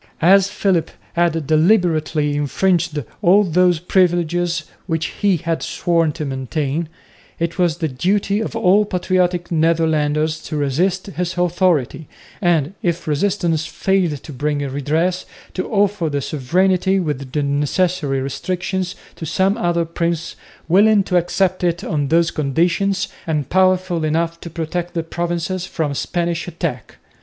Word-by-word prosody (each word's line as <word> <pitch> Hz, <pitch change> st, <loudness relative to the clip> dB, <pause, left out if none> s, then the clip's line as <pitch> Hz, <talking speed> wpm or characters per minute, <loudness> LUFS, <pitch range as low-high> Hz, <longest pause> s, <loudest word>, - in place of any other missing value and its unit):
As 190 Hz, +2 st, +6 dB
Philip 185 Hz, -6 st, 0 dB, 0.2 s
had 165 Hz, -2 st, +1 dB
deliberately 155 Hz, -3 st, +2 dB
infringed 155 Hz, +1 st, 0 dB, 0.2 s
all 195 Hz, +4 st, +5 dB
those 180 Hz, -1 st, +3 dB
privileges 175 Hz, -1 st, +1 dB, 0.2 s
which 165 Hz, -2 st, -1 dB, 0.2 s
he 200 Hz, -3 st, +3 dB
had 165 Hz, +1 st, -2 dB
sworn 165 Hz, -2 st, +1 dB
to 155 Hz, -1 st, -4 dB
maintain, 140 Hz, +3 st, -2 dB, 0.5 s
it 170 Hz, +2 st, -3 dB
was 170 Hz, -3 st, +2 dB
the 165 Hz, -2 st, -1 dB
duty 195 Hz, +9 st, 0 dB
of 220 Hz, 0 st, -4 dB
all 210 Hz, -2 st, +4 dB
patriotic 180 Hz, -2 st, 0 dB
Netherlanders 160 Hz, -1 st, +1 dB
to 155 Hz, -, -4 dB
resist 175 Hz, +7 st, 0 dB
his 180 Hz, -2 st, -4 dB
authority, 175 Hz, -5 st, +1 dB, 0.3 s
and, 170 Hz, -3 st, +2 dB
if 170 Hz, -1 st, -2 dB
resistance 165 Hz, 0 st, 0 dB
failed 175 Hz, -3 st, 0 dB
to 150 Hz, -, -9 dB
bring 145 Hz, +1 st, -1 dB
redress, 155 Hz, +7 st, -1 dB, 0.3 s
to 185 Hz, -, -3 dB
offer 205 Hz, -5 st, +1 dB
the 145 Hz, -1 st, -2 dB
sovereignty 185 Hz, +8 st, +1 dB
with 140 Hz, -6 st, -3 dB
the 150 Hz, +1 st, 0 dB
necessary 145 Hz, 0 st, 0 dB
restrictions 180 Hz, +6 st, -3 dB, 0.2 s
to 160 Hz, -, -6 dB
some 190 Hz, +5 st, +1 dB
other 175 Hz, -6 st, 0 dB
prince 170 Hz, 0 st, -2 dB, 0.3 s
willing 205 Hz, +3 st, +5 dB
to 180 Hz, -, +1 dB
accept 185 Hz, +1 st, 0 dB
it 175 Hz, -1 st, 0 dB
on 145 Hz, -3 st, -1 dB
those 165 Hz, +3 st, +3 dB
conditions 170 Hz, +7 st, 0 dB, 0.2 s
and 150 Hz, -4 st, -2 dB
powerful 185 Hz, -2 st, +2 dB
enough 165 Hz, +2 st, 0 dB
to 170 Hz, -, -7 dB
protect 170 Hz, +2 st, -4 dB
the 165 Hz, -, -1 dB
provinces 175 Hz, +2 st, -3 dB
from 150 Hz, -4 st, -2 dB
Spanish 170 Hz, +3 st, -2 dB
attack. 160 Hz, -, -4 dB
170 Hz, 135 wpm, -19 LUFS, 155-185 Hz, 0.5 s, As